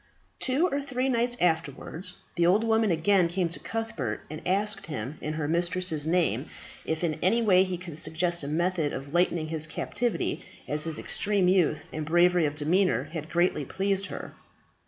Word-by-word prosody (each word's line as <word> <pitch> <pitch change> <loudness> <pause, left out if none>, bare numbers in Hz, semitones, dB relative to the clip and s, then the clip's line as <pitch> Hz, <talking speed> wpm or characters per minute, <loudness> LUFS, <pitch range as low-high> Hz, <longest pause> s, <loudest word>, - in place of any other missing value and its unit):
Two 265 +6 +2
or 285 -4 -1
three 270 -1 -1
nights 240 0 +1
afterwards 165 +2 -1 0.2
the 170 - +2
old 200 +5 +4
woman 225 -1 +2
again 175 +2 +3
came 175 0 0
to 170 - -4
Cuthbert, 165 - -3
and 155 - -6
asked 205 +3 0
him, 145 0 -5
in 155 - -3
her 155 -2 -2
mistress's 170 -1 0
name, 160 - +1 0.4
if 160 +2 -2
in 160 -2 -1
any 205 +6 +3
way 185 -4 +5
he 185 -1 -3
could 170 -3 -6
suggest 170 +1 0
a - - -4
method 165 0 0
of 140 +2 -6
lightening 175 -2 +1
his 155 -1 -2
captivity, 230 +7 -2 0.2
as 150 +1 0
his 160 -2 -3
extreme 200 -3 +1
youth, 180 -5 +2
and 155 -1 -4
bravery 175 0 +4
of 145 - -4
demeanour, 155 - +1
had 160 -1 -5
greatly 175 -3 +1
pleased 195 +6 -1
her. - - -7
175 Hz, 175 wpm, -27 LUFS, 155-195 Hz, 0.4 s, way